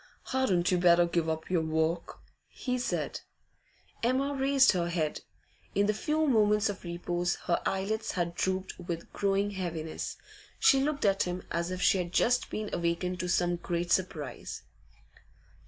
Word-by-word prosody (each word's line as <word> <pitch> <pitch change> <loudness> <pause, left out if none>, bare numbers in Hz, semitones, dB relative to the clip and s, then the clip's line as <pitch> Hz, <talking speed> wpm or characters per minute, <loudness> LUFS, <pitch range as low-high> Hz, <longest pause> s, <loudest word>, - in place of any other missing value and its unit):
'Hadn't 195 -10 +2
you 180 - +3
better 175 0 +6
give 170 -1 0
up 160 +2 -3
your 175 -3 +3
work?' 160 +1 -1 0.3
he 250 -1 -3
said. 245 - -2 0.8
Emma 265 +4 +1
raised 270 0 +4
her 175 -2 -1
head. 160 -3 -1 0.5
In 200 - +3
the 210 - +2
few 305 +8 0
moments 210 -5 +3
of 200 - -6
repose 175 0 -1
her 170 - +1
eyelids 200 +3 -1
had 170 -2 -1
drooped 185 +2 -2
with 170 -2 -6
growing 200 0 +1
heaviness; 165 -5 -4 0.4
she 270 -11 +5
looked 285 -3 0
at 195 -1 +3
him 180 0 -2
as 170 +1 -1
if 185 0 -3
she 195 - +4
had 175 -1 -3
just 245 +6 +2
been 215 -1 -4
awakened 175 +2 -1
to 180 - -2
some 175 -1 +2
great 175 0 -3
surprise. 155 -8 -2
180 Hz, 155 wpm, -30 LUFS, 170-210 Hz, 0.8 s, better